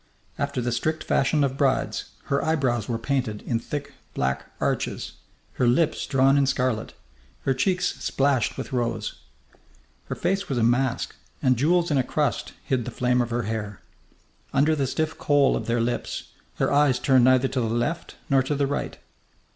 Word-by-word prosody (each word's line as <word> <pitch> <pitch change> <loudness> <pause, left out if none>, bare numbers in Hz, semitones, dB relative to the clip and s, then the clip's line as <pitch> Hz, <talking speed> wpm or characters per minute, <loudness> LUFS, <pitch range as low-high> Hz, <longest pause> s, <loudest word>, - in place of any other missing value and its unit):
After 140 -2 -1
the 120 0 -1
strict 155 +7 -1
fashion 145 +2 +2
of 135 -1 -1
brides, 135 -2 +1 0.2
her 140 - 0
eyebrows 130 -8 0
were 115 - 0
painted 115 -4 -2
in 115 - -1
thick 145 +4 -5 0.2
black 65 0 -1
arches, - - -1 0.5
her 125 - +4
lips 155 +6 +2
drawn 135 +1 +4
in 140 - +3
scarlet, 125 -4 -1 0.5
her 135 - +2
cheeks 180 +6 0
splashed 135 -4 +1
with - - -6
rose. 115 - -2 0.8
Her - - -4
face 195 +3 -1
was 135 - -1
a 115 - +2
mask, 125 +2 +1 0.2
and 130 -1 +3
jewels 170 +6 +2
in 140 - +3
a - - +3
crust 145 +3 -1
hid 130 -4 -1
the - - -3
flame 125 0 +1
of 120 - -2
her 120 0 -1
hair. 105 -2 -4 0.7
Under 150 +3 +3
the 140 -3 0
stiff 160 +4 -2
kohl 145 -2 +3
of - - -4
their 120 +1 +1
lids 120 +1 -2 0.3
her - - +1
eyes 145 -3 +4
turned 130 -2 +4
neither 130 0 +5
to 130 - -1
the 115 - 0
left 120 +9 -2
nor 135 -1 +4
to 130 +3 -1
the 140 0 +1
right. 140 +1 -3
130 Hz, 180 wpm, -25 LUFS, 120-145 Hz, 0.8 s, neither